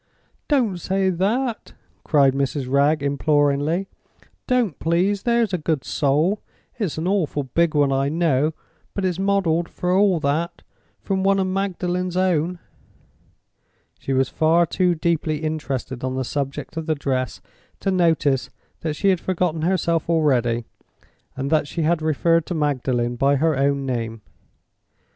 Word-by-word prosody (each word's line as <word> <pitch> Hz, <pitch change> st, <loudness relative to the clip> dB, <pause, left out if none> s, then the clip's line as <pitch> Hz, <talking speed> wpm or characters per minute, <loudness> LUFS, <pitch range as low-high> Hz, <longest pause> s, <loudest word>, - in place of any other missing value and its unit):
"Don't 235 Hz, -, +1 dB
say 190 Hz, +2 st, 0 dB
that!" 220 Hz, +7 st, -1 dB, 0.3 s
cried 140 Hz, -3 st, +4 dB
Mrs. 135 Hz, 0 st, -1 dB
Wragge, 140 Hz, +3 st, +2 dB
imploringly. 145 Hz, +4 st, +1 dB, 0.6 s
"Don't 240 Hz, -, +1 dB
please, 185 Hz, +5 st, +1 dB
there's 235 Hz, -3 st, +1 dB
a 180 Hz, -, 0 dB
good 155 Hz, -3 st, -1 dB
soul! 155 Hz, +8 st, +1 dB, 0.4 s
It's 195 Hz, -9 st, -2 dB
an 160 Hz, +3 st, -2 dB
awful 170 Hz, -7 st, 0 dB
big 155 Hz, +5 st, 0 dB
one, 145 Hz, -2 st, +3 dB
I 135 Hz, +1 st, +1 dB
know; 155 Hz, -2 st, +1 dB, 0.4 s
but 195 Hz, -, -1 dB
it's 180 Hz, -1 st, -1 dB
modeled, 190 Hz, -4 st, +1 dB
for 180 Hz, +1 st, -1 dB
all 195 Hz, -3 st, +3 dB
that, 165 Hz, +5 st, -1 dB, 0.4 s
from 190 Hz, -1 st, -1 dB
one 195 Hz, 0 st, +3 dB
of 190 Hz, -, +1 dB
Magdalen's 185 Hz, -1 st, -2 dB
own." 180 Hz, -1 st, +1 dB, 1.4 s
She -, -, -5 dB
was 135 Hz, -1 st, +2 dB
far 160 Hz, +5 st, +3 dB
too 180 Hz, +1 st, +1 dB
deeply 155 Hz, -2 st, -1 dB
interested 140 Hz, -5 st, -3 dB
on 130 Hz, 0 st, -2 dB
the 130 Hz, -, -1 dB
subject 140 Hz, +4 st, -4 dB
of 160 Hz, 0 st, -4 dB
the 160 Hz, -, +1 dB
dress 130 Hz, -3 st, -2 dB, 0.4 s
to 195 Hz, -, 0 dB
notice 160 Hz, -7 st, +2 dB, 0.3 s
that 155 Hz, -2 st, -3 dB
she 195 Hz, -, +1 dB
had 185 Hz, -2 st, +2 dB
forgotten 175 Hz, -3 st, -1 dB
herself 170 Hz, -2 st, 0 dB
already, 125 Hz, -8 st, +2 dB, 0.7 s
and 135 Hz, +2 st, -3 dB
that 155 Hz, -2 st, +2 dB
she 165 Hz, +3 st, -3 dB
had 160 Hz, +1 st, +1 dB
referred 160 Hz, +1 st, +2 dB
to 175 Hz, -, -3 dB
Magdalen 130 Hz, -5 st, 0 dB
by 140 Hz, +3 st, +3 dB
her 155 Hz, +2 st, +2 dB
own 140 Hz, 0 st, +1 dB
name. 115 Hz, -4 st, -3 dB
160 Hz, 150 wpm, -22 LUFS, 140-180 Hz, 1.4 s, cried